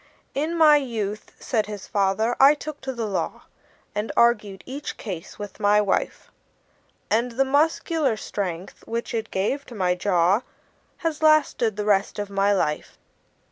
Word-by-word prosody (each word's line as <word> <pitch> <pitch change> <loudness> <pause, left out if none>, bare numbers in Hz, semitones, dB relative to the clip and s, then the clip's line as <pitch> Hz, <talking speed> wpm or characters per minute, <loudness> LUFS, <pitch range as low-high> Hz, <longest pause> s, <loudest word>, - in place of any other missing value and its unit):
"In 310 +5 -1
my 305 -2 +7
youth," 215 -6 -4
said 220 -4 -1
his 210 -2 -7
father, 205 +4 +1
"I 275 +2 +7
took 300 0 -8
to 265 - -4
the 235 -3 -3
law, 200 -3 -3 0.5
And 210 +1 -2
argued 210 -5 +2
each 275 +3 -6
case 185 -7 -7
with 205 0 -8
my 205 0 +4
wife; 205 -2 -1 0.8
And 235 +2 +1
the 270 +3 +2
muscular 295 -2 +1
strength, 185 -4 -5
which 230 +1 -3
it 225 -1 -2
gave 215 +9 -1
to 240 - -10
my 180 -3 +1
jaw, 180 +2 +2 0.6
Has 315 -2 -1
lasted 310 -8 +3
the 210 0 -3
rest 200 -2 +2
of 205 -1 -4
my 200 +1 +2
life." 150 -6 -1
215 Hz, 155 wpm, -24 LUFS, 200-270 Hz, 0.8 s, my